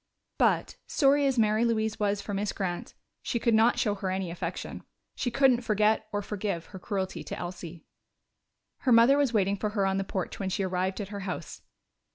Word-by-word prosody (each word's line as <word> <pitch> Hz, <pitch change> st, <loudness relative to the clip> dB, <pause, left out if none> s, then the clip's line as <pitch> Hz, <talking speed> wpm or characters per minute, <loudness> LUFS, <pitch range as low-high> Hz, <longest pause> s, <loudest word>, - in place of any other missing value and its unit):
But, -, -, +2 dB
sorry 285 Hz, -1 st, +3 dB
as 265 Hz, -2 st, 0 dB
Mary 215 Hz, 0 st, +3 dB
Louise 220 Hz, -1 st, 0 dB
was 205 Hz, -1 st, 0 dB
for 205 Hz, -, -5 dB
Miss 205 Hz, +1 st, -1 dB
Grant, 180 Hz, -3 st, -4 dB, 0.3 s
she -, -, -2 dB
could 235 Hz, 0 st, +1 dB
not 225 Hz, +2 st, +4 dB
show 210 Hz, -, +1 dB
her 195 Hz, -2 st, -3 dB
any 185 Hz, -2 st, -2 dB
affection. 170 Hz, -, -5 dB, 0.3 s
She 245 Hz, -, -2 dB
couldn't 250 Hz, 0 st, +4 dB
forget 215 Hz, -1 st, +2 dB
or 205 Hz, 0 st, -2 dB
forgive 195 Hz, -5 st, -3 dB
her 190 Hz, -, -7 dB
cruelty 190 Hz, -1 st, -3 dB
to -, -, -6 dB
Elsie. 175 Hz, -2 st, -7 dB, 0.9 s
Her 255 Hz, -, 0 dB
mother 235 Hz, +4 st, +7 dB
was 280 Hz, -4 st, +2 dB
waiting 200 Hz, -3 st, +1 dB
for 210 Hz, -, -1 dB
her 205 Hz, -2 st, 0 dB
on 190 Hz, 0 st, +1 dB
the 195 Hz, -, 0 dB
porch 190 Hz, -2 st, -4 dB
when 195 Hz, -2 st, -2 dB
she 190 Hz, +1 st, -1 dB
arrived 185 Hz, +2 st, -1 dB
at 200 Hz, -, -6 dB
her 205 Hz, -1 st, -5 dB
house. 190 Hz, -2 st, -6 dB
205 Hz, 200 wpm, -28 LUFS, 190-230 Hz, 0.9 s, mother